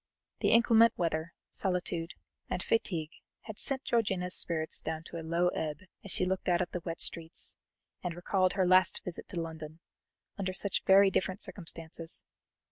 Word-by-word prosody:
The - - +2
inclement 230 0 +6
weather, 165 -1 -1 0.2
solitude, 180 -3 -2 0.3
and 180 - -1
fatigue 170 -8 0 0.3
had 220 -2 -8
sent 270 -1 -1
Georgiana's 190 -6 +1
spirits 160 -2 -1
down 160 0 -3
to 170 - -8
a - - -5
low 170 +2 +2
ebb 155 -3 -3 0.2
as 200 - -7
she 185 - +2
looked 185 0 -1
out 175 -1 +4
at 180 -1 -1
the 180 - -3
wet 165 -1 -4
streets, 165 -1 -2 0.5
and 175 -2 -2
recalled 185 +1 +1
her 190 -2 +2
last 185 +1 +5
visit 180 - -5
to 175 - -4
London, 160 -1 -6 0.6
under 185 -1 -1
such 200 +1 0
very 195 0 +7
different 185 0 0
circumstances. 165 -2 -6
180 Hz, 165 wpm, -31 LUFS, 165-190 Hz, 0.6 s, very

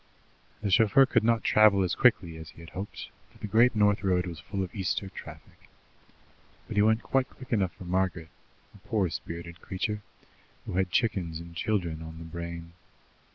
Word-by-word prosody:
The 100 - 0
chauffeur 110 +7 +6
could 130 - +2
not 115 0 +2
travel 105 -3 +5
as 90 - 0
quickly 105 -9 +3
as 80 -1 -9
he 85 - -14
had 80 - -12
hoped, 95 +2 -6 0.2
for - - -20
the - - -6
Great 115 +4 +4
North 105 0 +3
Road 90 -2 +2
was 85 -3 -6
full 95 +3 -3
of 90 - -7
Easter 95 0 -2
traffic. - - -12 1.0
But - - -6
he 105 - +4
went 110 +2 +3
quite 135 -1 +1
quick 130 -1 -8
enough 95 -5 +1
for - - -11
Margaret, 90 -2 -1 0.4
a 105 - -16
poor 100 -6 +1
spirited 85 +3 -7
creature, 105 +3 -3 0.6
who - - -5
had 95 0 +1
chickens 90 -6 0
and 85 0 -10
children 85 -4 -1
on 80 0 -8
the 80 - -8
brain. 85 0 -7
95 Hz, 185 wpm, -28 LUFS, 85-105 Hz, 1.0 s, chauffeur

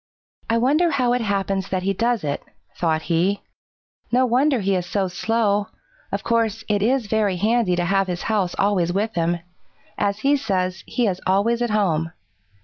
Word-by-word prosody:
"I 230 - +3
wonder 295 +9 +3
how 255 -5 +1
it 250 - 0
happens 195 -2 -1
that 185 -1 -1
he 195 +1 +1
does 230 0 0
it," 145 -1 -2 0.3
thought 160 -2 0
he. 180 +4 +1 0.7
"No 255 +2 +4
wonder 260 +2 +2
he 195 0 +1
is 180 -2 -1
so 195 0 0
slow. 205 +2 0 0.4
Of - - -3
course, 225 -1 0
it 205 -2 +1
is 245 +3 +2
very 205 -2 +1
handy 215 -1 +2
to 175 0 0
have 195 +1 +2
his 180 -1 -3
house 200 -5 0
always 190 -4 +2
with 210 +4 -1
him. 170 0 0 0.6
As 200 +1 0
he 280 +1 +3
says, 185 -7 -2
he 245 - 0
is 185 -3 -1
always 210 +5 +2
at 240 - +1
home. 165 -7 0
200 Hz, 180 wpm, -22 LUFS, 185-230 Hz, 0.7 s, No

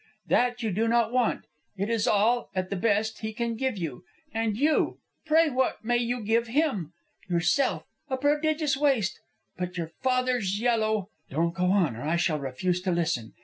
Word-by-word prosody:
That 245 -1 +1
you 220 - 0
do 220 +5 +1
not 230 -1 +2
want. 250 -2 +1 0.3
It 200 +2 -1
is 230 -2 0
all, 220 +4 +2
at 185 0 -2
the - - 0
best, 215 +2 +1
he 220 0 -4
can 235 0 -2
give 260 -1 -1
you. 160 -8 -5 0.3
And 225 -2 -1
you, 300 +4 +2 0.3
pray 320 0 +4
what 260 -3 0
may 240 +1 +2
you 240 0 -1
give 225 +2 +1
him? 230 - 0 0.4
Yourself? 175 +10 +1 0.3
A 260 - -1
prodigious 300 +1 +1
waste! 270 -8 +1 0.4
But 180 0 -3
your 165 -2 -4
father's 250 -6 +1
yellow 220 -4 +1
" - - -43
"Don't 165 +4 0
go 180 0 0
on, 180 - +2
or 115 - -8
I 155 +5 0
shall 170 -3 +1
refuse 175 +7 -1
to 185 0 -1
listen. 160 -10 -1
220 Hz, 185 wpm, -27 LUFS, 180-250 Hz, 0.4 s, pray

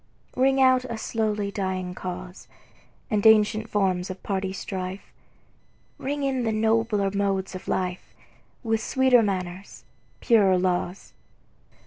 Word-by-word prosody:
Ring 265 +1 +3
out 255 -1 +5
a 235 -3 -5
slowly 215 -2 -2
dying 185 -2 -3
cause, 180 0 -7 0.6
And 210 -2 +1
ancient 220 0 +4
forms 190 -3 0
of 185 0 -8
party 190 -1 -2
strife; 190 0 -6 0.9
Ring 285 +1 -3
in 265 -2 0
the 225 - 0
nobler 220 -2 +1
modes 195 -1 -1
of 185 - -8
life, 180 -1 -3 0.5
With 225 -1 0
sweeter 260 0 +4
manners, 185 -2 -4 0.4
purer 200 -6 +4
laws. 180 +1 -2
200 Hz, 120 wpm, -25 LUFS, 185-225 Hz, 0.9 s, out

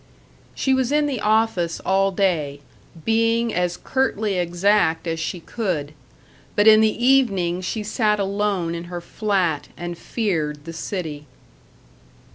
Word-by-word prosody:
She 265 - +1
was 260 -1 +1
in 300 0 +3
the 275 -5 -2
office 210 -6 +1
all 195 +1 +2
day, 160 -8 0 0.4
being 230 0 +2
as 180 -1 0
curtly 215 -7 -1
exact 175 -1 +2
as 165 -1 -2
she 160 +3 -3
could. 165 -7 -3 0.6
But 205 - +3
in 220 0 +8
the 220 +2 +1
evening 195 -10 +3
she 210 +4 -3
sat 210 0 +1
alone 200 -3 -1
in 170 0 -5
her 175 0 -6
flat 180 -4 -1
and 175 0 -5
feared 160 -9 -2
the 165 - -7
city. 160 -4 -5
195 Hz, 135 wpm, -22 LUFS, 170-220 Hz, 0.6 s, in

